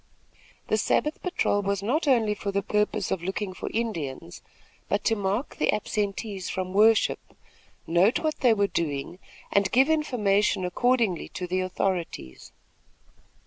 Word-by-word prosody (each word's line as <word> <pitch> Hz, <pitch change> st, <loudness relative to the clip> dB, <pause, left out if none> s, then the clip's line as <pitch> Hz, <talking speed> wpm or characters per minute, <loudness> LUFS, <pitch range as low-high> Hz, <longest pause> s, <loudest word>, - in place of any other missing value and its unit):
The 215 Hz, -, +1 dB
Sabbath 300 Hz, +8 st, 0 dB
patrol 275 Hz, -, 0 dB
was 200 Hz, -1 st, -2 dB
not 295 Hz, +9 st, 0 dB
only 230 Hz, -6 st, +3 dB
for 205 Hz, -1 st, -4 dB
the 200 Hz, 0 st, -1 dB
purpose 210 Hz, -1 st, 0 dB
of 185 Hz, -, -1 dB
looking 190 Hz, +2 st, -3 dB
for -, -, -6 dB
Indians, 160 Hz, -, -4 dB, 0.5 s
but 205 Hz, -, 0 dB
to 225 Hz, -, +2 dB
mark 205 Hz, +5 st, -2 dB
the -, -, +2 dB
absentees 205 Hz, -2 st, -3 dB
from 185 Hz, 0 st, -3 dB
worship, 220 Hz, +2 st, +4 dB, 0.7 s
note 175 Hz, +7 st, +3 dB
what 310 Hz, -1 st, -2 dB
they 240 Hz, -4 st, +4 dB
were 205 Hz, -1 st, +2 dB
doing, 165 Hz, -1 st, -3 dB, 0.3 s
and 200 Hz, -1 st, +2 dB
give 265 Hz, +5 st, +4 dB
information 210 Hz, -11 st, +1 dB
accordingly 230 Hz, 0 st, +1 dB
to 180 Hz, -, -3 dB
the 185 Hz, +1 st, -1 dB
authorities. 180 Hz, -, -3 dB
200 Hz, 145 wpm, -26 LUFS, 185-225 Hz, 0.7 s, worship